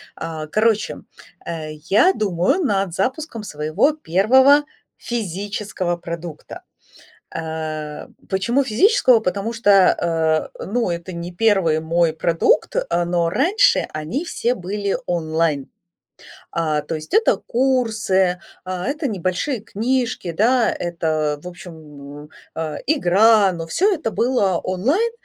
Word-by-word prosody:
А, 160 Hz, -2 st, -6 dB
короче, 215 Hz, +4 st, +1 dB, 0.5 s
э, 155 Hz, -2 st, -5 dB, 0.2 s
я 285 Hz, -, +5 dB
думаю 210 Hz, -, 0 dB
над 195 Hz, -, 0 dB
запуском 255 Hz, -, -3 dB
своего 155 Hz, -, 0 dB
первого 265 Hz, -, +4 dB, 0.3 s
физического 200 Hz, -4 st, -3 dB
продукта. 170 Hz, -2 st, -8 dB, 0.7 s
Э, 155 Hz, -2 st, -5 dB, 0.2 s
почему 235 Hz, +8 st, +1 dB
физического? 255 Hz, -, +4 dB
Потому 200 Hz, +3 st, -2 dB
что, 170 Hz, -7 st, +2 dB
э, -, -, -6 dB
ну, 230 Hz, -1 st, -1 dB
это 170 Hz, +2 st, -5 dB
не 170 Hz, +1 st, -6 dB
первый 185 Hz, -6 st, +2 dB
мой 165 Hz, 0 st, +1 dB
продукт, 165 Hz, +1 st, +1 dB
э, 170 Hz, +1 st, 0 dB
но 170 Hz, -1 st, +1 dB
раньше 390 Hz, -, +3 dB
они 155 Hz, -, -3 dB
все 245 Hz, -7 st, -1 dB
были 200 Hz, +1 st, -3 dB
онлайн. 160 Hz, -4 st, -1 dB, 0.8 s
А, 155 Hz, -3 st, 0 dB
то 155 Hz, +2 st, -5 dB
есть 155 Hz, -, -8 dB
это 445 Hz, +2 st, +4 dB
курсы, 220 Hz, -8 st, +1 dB, 0.2 s
а, 185 Hz, -1 st, -4 dB
это 290 Hz, +2 st, -2 dB
небольшие 195 Hz, -, -2 dB
книжки, 230 Hz, -3 st, -2 dB
да, 230 Hz, +7 st, +2 dB
это, 155 Hz, -3 st, -2 dB
в -, -, -7 dB
общем, 150 Hz, -4 st, -12 dB, 0.3 s
а, 155 Hz, -2 st, -4 dB
игра, 215 Hz, -, +4 dB
но 165 Hz, -2 st, -6 dB
всё 390 Hz, -, +2 dB
это 315 Hz, -9 st, -2 dB
было 225 Hz, -7 st, +1 dB
онлайн. 275 Hz, -, 0 dB
185 Hz, 120 wpm, -20 LUFS, 165-235 Hz, 0.8 s, я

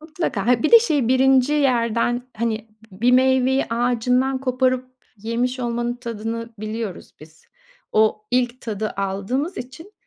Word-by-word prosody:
Mutlaka. 310 Hz, -, -3 dB
Ha, 245 Hz, -2 st, +3 dB
bir 310 Hz, -, +1 dB
de 465 Hz, -, +11 dB
şey 295 Hz, -, 0 dB
1. 260 Hz, +1 st, +4 dB
yerden, 240 Hz, -4 st, +1 dB
hani, 225 Hz, 0 st, -2 dB, 0.2 s
b 185 Hz, -, -15 dB
bir 245 Hz, +2 st, +4 dB
meyveyi 260 Hz, +1 st, +3 dB
ağacından 250 Hz, +2 st, +1 dB
koparıp 255 Hz, -1 st, 0 dB, 0.3 s
yemiş 240 Hz, +4 st, -2 dB
olmanın 240 Hz, 0 st, -2 dB
tadını 230 Hz, -1 st, -5 dB
biliyoruz 215 Hz, -2 st, -6 dB
biz. 155 Hz, +1 st, -16 dB, 0.5 s
O 215 Hz, 0 st, +2 dB
ilk 250 Hz, 0 st, 0 dB
tadı 215 Hz, -1 st, -3 dB
aldığımız 200 Hz, -, -2 dB
için, 295 Hz, +11 st, -9 dB
245 Hz, 135 wpm, -21 LUFS, 225-260 Hz, 0.5 s, de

